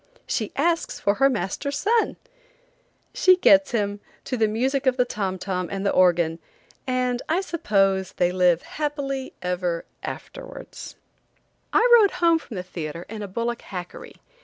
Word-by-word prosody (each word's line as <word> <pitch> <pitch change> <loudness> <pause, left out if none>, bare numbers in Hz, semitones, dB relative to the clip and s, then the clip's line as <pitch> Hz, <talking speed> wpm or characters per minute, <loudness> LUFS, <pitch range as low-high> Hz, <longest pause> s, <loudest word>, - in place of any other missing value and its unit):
She 215 -4 -2
asks 335 +4 0
for 200 - +2
her 275 - +6
master's 275 +4 -2
son! 445 +7 +1 1.0
She 370 0 +5
gets 290 -5 +5
him, 205 -3 -1 0.2
to 255 - -3
the 225 -3 +2
music 260 +5 0
of 255 0 +3
the 250 - +3
tom 195 -5 -3
tom 185 -1 -3
and 195 0 -3
the 200 - +3
organ, 170 -3 +3 0.5
and 250 -1 0
I 340 +4 +2
suppose 195 - +1
they 175 0 +1
live 180 -2 +3
happy 280 -3 -4
ever 180 -2 -2 0.2
afterwards. - - -8 0.8
I 480 - +4
rode 405 - +3
home 335 -2 +3
from 230 - -10
the 180 - -4
theatre 170 -2 -6
in 220 0 -6
a 205 - -4
bullock 235 +4 -3
hackery. 180 -3 -8
220 Hz, 155 wpm, -24 LUFS, 185-280 Hz, 1.0 s, her